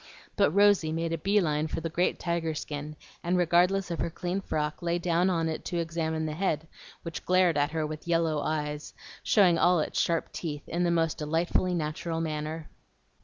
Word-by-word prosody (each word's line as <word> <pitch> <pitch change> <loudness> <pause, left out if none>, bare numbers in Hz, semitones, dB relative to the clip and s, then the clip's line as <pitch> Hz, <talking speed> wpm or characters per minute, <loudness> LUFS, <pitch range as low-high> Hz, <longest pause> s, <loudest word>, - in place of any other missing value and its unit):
But - - +4
Rosy 200 -2 +4
made 165 +1 -1
a - - 0
bee 200 +5 +3
line 155 -4 0
for - - -3
the 165 - -3
great 175 +2 +1
tiger 170 -2 -1
skin, 150 0 -5 0.3
and 175 +1 +1
regardless 180 +2 +3
of 170 - -3
her - - 0
clean 180 +3 -3
frock 150 -4 -2
lay 170 0 0
down 175 +1 +1
on 165 -3 +1
it 160 - -3
to 175 - -2
examine 160 -1 -1
the 155 - -3
head, 160 -2 -1 0.4
which 165 -1 -6
glared 185 -2 +3
at 145 0 +2
her 160 -1 -1
with 155 +2 -7
yellow 165 -3 +1
eyes, 150 -1 -3 0.3
showing 180 -6 +4
all 180 0 +4
its 155 - 0
sharp 165 -1 0
teeth 150 -4 -5
in 175 +1 -1
the 175 - +2
most 165 -2 +1
delightfully 165 +4 0
natural 165 +1 -2
manner. 155 0 -3
165 Hz, 195 wpm, -28 LUFS, 155-175 Hz, 0.4 s, But